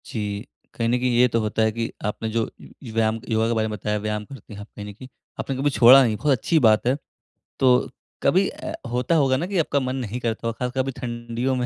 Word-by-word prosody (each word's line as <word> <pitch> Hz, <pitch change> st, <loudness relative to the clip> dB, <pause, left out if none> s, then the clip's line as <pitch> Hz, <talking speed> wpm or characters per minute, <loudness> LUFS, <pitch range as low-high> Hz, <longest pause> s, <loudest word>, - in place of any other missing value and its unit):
जी, 105 Hz, 0 st, -4 dB, 0.3 s
कहीं 115 Hz, -, -1 dB
न -, -, +2 dB
कहीं 125 Hz, 0 st, +1 dB
ये 125 Hz, +1 st, +6 dB
तो 115 Hz, -1 st, 0 dB
होता 110 Hz, +1 st, -1 dB
है 110 Hz, 0 st, +3 dB
कि 115 Hz, +1 st, -3 dB
आपने 110 Hz, +2 st, -2 dB
जो 115 Hz, +1 st, 0 dB
व् 120 Hz, -, -13 dB
व्यायाम 110 Hz, 0 st, +1 dB
योगा 110 Hz, 0 st, +2 dB
के 115 Hz, -, +1 dB
बारे 110 Hz, 0 st, +1 dB
में 105 Hz, -1 st, -4 dB
बताया 105 Hz, +1 st, -2 dB
व्यायाम 105 Hz, 0 st, -3 dB
करते 130 Hz, -2 st, -12 dB
हैं 100 Hz, -, -9 dB
आप 105 Hz, -, -10 dB
कहीं 105 Hz, -, -7 dB
न -, -, -9 dB
कहीं 130 Hz, +6 st, -12 dB, 0.3 s
आपने 135 Hz, -, -3 dB
कभी 135 Hz, +3 st, +1 dB
छोड़ा 130 Hz, 0 st, +8 dB
नहीं 115 Hz, -3 st, +1 dB
बहुत 150 Hz, +4 st, +1 dB
अच्छी 160 Hz, +8 st, +2 dB
बात 110 Hz, -3 st, +4 dB
है। 130 Hz, -, +3 dB, 0.6 s
तो 125 Hz, -1 st, +4 dB, 0.3 s
कभी 185 Hz, +8 st, +3 dB
अ, -, -, -7 dB, 0.2 s
होता 125 Hz, +7 st, +1 dB
होगा 135 Hz, -4 st, +3 dB
ना 160 Hz, -, -2 dB
कि 195 Hz, 0 st, -2 dB
आपका 145 Hz, -3 st, +1 dB
मन 130 Hz, -1 st, -2 dB
नहीं 125 Hz, -2 st, -4 dB
करता 115 Hz, -1 st, -2 dB
होगा 115 Hz, -, -3 dB
ख़ासकर 130 Hz, +1 st, -1 dB
कभी 135 Hz, +1 st, -3 dB
ठंडियों 120 Hz, +1 st, -2 dB
में 125 Hz, -1 st, -1 dB
120 Hz, 250 wpm, -23 LUFS, 110-130 Hz, 0.6 s, छोड़ा